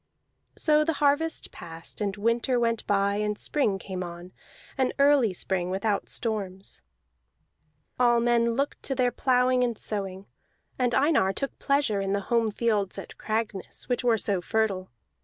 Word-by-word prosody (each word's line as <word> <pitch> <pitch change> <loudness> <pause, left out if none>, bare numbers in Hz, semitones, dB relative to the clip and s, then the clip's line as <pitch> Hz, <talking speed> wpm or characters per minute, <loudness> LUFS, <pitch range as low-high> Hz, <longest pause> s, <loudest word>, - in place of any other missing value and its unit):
So 305 -1 +3
the 325 +1 0
harvest 295 +3 +1
passed, 165 +4 -9
and 200 -1 -1
winter 235 +4 +1
went 230 -1 0
by 200 0 +2
and 210 0 -1
spring 220 -9 0
came 190 -1 -6
on, 175 +1 -9 0.4
an 260 -2 +1
early 280 -6 +4
spring 180 0 -1
without 200 +2 -1
storms. 200 -4 -3 1.2
All 240 -1 +5
men 235 0 +2
looked 280 +3 -2
to 270 - -3
their 250 -1 +2
plowing 250 0 +2
and 235 -3 -1
sowing; 195 -2 -3 0.5
and 245 -2 +2
Einar 270 -10 +3
took 275 +7 -4
pleasure 275 -8 +1
in 195 0 -1
the 200 - 0
home 230 -1 +3
fields 210 -3 0
at - - -9
Cragness, 215 -3 -3
which 245 - 0
were 235 -2 +3
so 200 -3 0
fertile. 195 -2 -1
225 Hz, 155 wpm, -27 LUFS, 195-250 Hz, 1.2 s, All